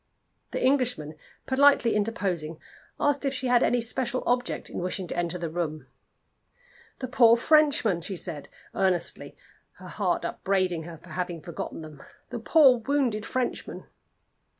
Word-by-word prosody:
The - - -2
Englishman 250 - +1 0.3
politely 265 -3 +4
interposing, 190 -7 -2 0.4
asked 290 -1 +1
if 275 -1 -1
she 260 - -3
had 245 -1 +4
any 245 -1 +2
special 245 +2 -2
object 245 0 0
in - - -6
wishing 180 +1 -3
to - - -5
enter 175 0 -1
the 170 -1 -4
room. 160 -2 -4 1.1
"The 255 - -5
poor 235 -2 +5
Frenchmen!" 280 - +3
she 195 +3 -5
said, 165 -4 -4 0.2
earnestly, 185 -3 0 0.4
her - - -12
heart - - -1
upbraiding 185 -4 -1
her 170 -1 -9
for 175 +3 -17
having 175 0 -4
forgotten 165 0 -7
them. 155 -3 -11 0.3
"The 240 - -4
poor 265 0 +5
wounded 240 -4 -1
Frenchmen!" 255 -1 -3
215 Hz, 145 wpm, -26 LUFS, 170-255 Hz, 1.1 s, poor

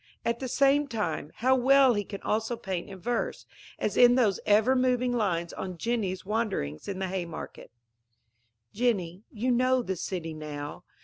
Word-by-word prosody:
At 235 0 0
the 265 - -3
same 280 +3 +3
time, 205 - -3
how 260 +3 +3
well 265 0 +5
he 205 -2 -1
can 200 0 -8
also 225 +2 -1
paint 190 -3 -4
in 195 - -8
verse, 240 +5 -2 0.3
as - - -2
in 245 0 +7
those 220 -7 +2
ever 220 +5 +4
moving 250 -1 +2
lines 175 -7 -1
on 185 -2 -6
Jenny's 200 -3 -2
wanderings 200 - -2
in 195 - -3
the 190 0 -2
Haymarket: 175 -3 -6 1.0
Jenny, 195 -6 0
you 240 +4 -1
know 255 +1 +3
the 190 -4 -2
city 165 -2 -4
now. 150 +1 -7
215 Hz, 165 wpm, -28 LUFS, 180-245 Hz, 1.0 s, in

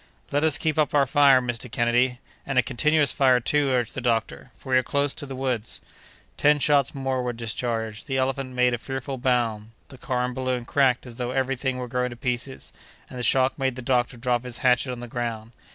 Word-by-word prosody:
"Let 145 +2 +1
us 155 -3 +4
keep 155 -1 -1
up 150 -1 +1
our 140 -1 +5
fire, 140 -1 +5
Mr. 120 0 -4
Kennedy." 120 +2 +2 0.3
"And 135 - -3
a 125 - +5
continuous 150 +4 +2
fire, 130 -3 +4
too," 145 +4 +1
urged 125 -3 0
the 135 - -5
doctor, 115 -3 -1
"for 130 - -9
we 130 - +6
are - - +1
close 140 +2 0
on 145 - -8
the 135 - -5
woods." 125 -4 -2 0.6
Ten 150 0 +4
shots 145 -2 +2
more 135 -1 -1
were 125 -1 -2
discharged. 115 -1 -3
The 135 - -1
elephant 130 0 -2
made 125 0 +3
a 120 - -2
fearful 135 +1 -5
bound; 115 -4 0 0.2
the 130 - -13
car 125 -1 -1
and 125 - -4
balloon 130 -1 -2
cracked 130 -1 +2
as 120 -2 -10
though 125 -1 -3
every 135 +1 0
thing 130 0 -2
were 125 -1 -4
going 125 +1 -1
to 120 - -8
pieces, 125 +2 -4 0.4
and 125 - -7
the - - -3
shock 130 +3 +2
made 130 -2 0
the 130 - -7
doctor 120 -1 0
drop 120 0 0
his 125 -2 -5
hatchet 125 +1 +3
on 120 -1 -6
the 120 - -7
ground. 115 -2 -4
125 Hz, 225 wpm, -25 LUFS, 120-135 Hz, 0.6 s, we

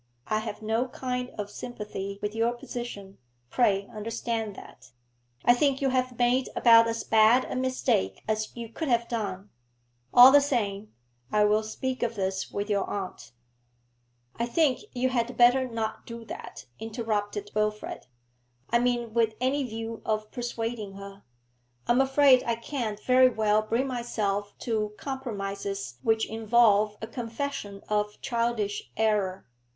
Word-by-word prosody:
I 215 - 0
have 220 -1 -6
no 225 +4 0
kind 250 -1 -4
of 205 -1 -4
sympathy 205 -4 -6
with 210 0 -2
your 230 +2 +1
position, 240 -5 -7 0.3
pray 200 -5 +2
understand 225 -1 -3
that. 125 - -14 0.5
I 240 - +7
think 270 +1 +2
you 275 - +1
have 255 -1 -1
made 250 +1 +2
about 230 -1 +7
as 230 0 -2
bad 225 +3 +5
a - - -5
mistake 255 - 0
as 215 0 -1
you 235 -1 -5
could 315 +7 -4
have 235 -2 +2
done. 200 -4 -4 0.6
All 250 +2 +10
the 285 +1 +7
same, 215 -7 -1 0.4
I 210 0 +4
will 210 +1 +3
speak 255 +4 -4
of 235 -1 -1
this 190 -1 -2
with 200 0 -3
your 205 -2 0
aunt 195 - -5 0.5
' 120 0 -43
'I 235 - 0
think 275 0 +2
you 255 0 +1
had 245 -1 -1
better 245 +2 +5
not 225 -2 -4
do 230 -1 -8
that,' - - -9
interrupted 210 -2 -3
Wilfrid, 215 0 -2 0.6
'I 235 - +4
mean 240 -2 0
with 225 -2 +2
any 265 +3 +1
view 225 -1 -5
of 215 -1 -2
persuading 230 -4 -4
her. 200 0 -10 0.6
I - - +1
am 245 +2 +5
afraid 270 -1 +5
I 235 - +2
can't 230 -3 -4
very 255 +2 +5
well 215 -2 +2
bring 230 +5 0
myself 210 -5 -2
to 215 -3 -1
compromises 200 - -5
which 220 +4 +2
involve 215 -2 +3
a - - -3
confession 230 -3 -5
of 210 0 -1
childish 230 -4 -1
error. 205 -4 +1
225 Hz, 150 wpm, -27 LUFS, 210-245 Hz, 0.6 s, All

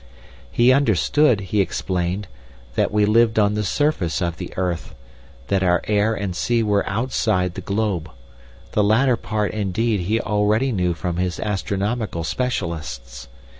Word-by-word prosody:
"He 120 +2 +5
understood, 130 - +3
he 100 +2 0
explained, 90 +1 -2 0.5
that - - +1
we 105 0 +3
lived 110 +1 +3
on 105 -1 +3
the 105 0 -1
surface 105 - 0
of 85 -3 -2
the - - -6
earth, 90 -7 -2 0.5
that 100 -1 +2
our 90 -2 +2
air 105 +1 +2
and 100 -4 -3
sea 115 +4 +1
were 105 -2 +1
outside 100 -4 0
the 95 - -6
globe; 100 -5 -1 0.6
the 105 - +2
latter 120 +5 +3
part, 110 -2 -2
indeed, 110 +1 0
he 105 +6 0
already 105 +5 +1
knew 90 -5 0
from 85 0 -3
his 90 -1 -1
astronomical 100 -1 -2
specialists. 80 - -4
105 Hz, 145 wpm, -22 LUFS, 90-110 Hz, 0.6 s, He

